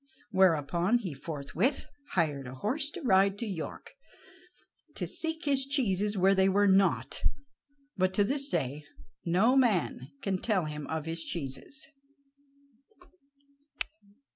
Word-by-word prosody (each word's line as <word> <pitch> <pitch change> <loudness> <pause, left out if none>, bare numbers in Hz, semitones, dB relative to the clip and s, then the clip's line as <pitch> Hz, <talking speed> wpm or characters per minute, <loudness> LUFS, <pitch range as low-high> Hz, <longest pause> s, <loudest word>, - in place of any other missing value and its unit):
Thereupon 180 +2 +3
he 190 -10 -5
forthwith 150 - -2 0.3
hired 145 -6 0
a 125 - -8
horse 270 - 0
to 335 +2 -8
ride 195 -3 +4
to 235 - -3
York, 185 -7 -6 1.0
to - - -2
seek 325 0 -3
his 275 -2 +4
cheeses 210 -7 +1
where 190 +1 +5
they 190 0 +4
were 205 +2 +3
not, 195 0 +2 0.8
but 185 0 +2
to 205 - +4
this 275 +6 +1
day 145 - -2 0.4
no 190 +9 +3
man 205 - +2 0.2
can 190 -2 0
tell 195 -6 +1
him 150 -1 -5
of 160 -1 -3
his 165 0 -2
cheeses. 170 - -4
190 Hz, 125 wpm, -30 LUFS, 160-235 Hz, 1.0 s, where